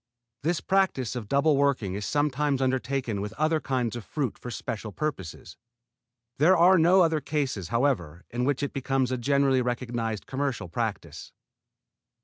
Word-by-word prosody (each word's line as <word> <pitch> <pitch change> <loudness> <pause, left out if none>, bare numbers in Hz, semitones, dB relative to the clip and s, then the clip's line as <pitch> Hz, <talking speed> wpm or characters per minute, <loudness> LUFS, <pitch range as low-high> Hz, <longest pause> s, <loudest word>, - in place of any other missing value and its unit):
This 165 +3 0
practise 185 - +1
of 115 -4 -5
double 140 +5 +3
working 135 -9 +1
is 100 +1 -4
sometimes 145 -1 +1
undertaken 130 -4 -1
with 105 +1 -5
other 155 +4 +1
kinds 125 -5 -1
of 120 - -6
fruit 135 +1 -3
for 125 - -9
special 110 -2 -5
purposes. 100 - -5 0.8
There 175 +5 +5
are 180 +2 +6
no 180 +4 +5
other 160 -3 +2
cases, 135 - -2
however, 115 - -1
in 120 +1 -2
which 140 +1 0
it 140 - -3
becomes 135 -1 0
a 130 - 0
generally 140 0 +2
recognized 120 -3 -3
commercial 135 -8 -3
practise. - - -4
135 Hz, 150 wpm, -27 LUFS, 115-145 Hz, 0.8 s, are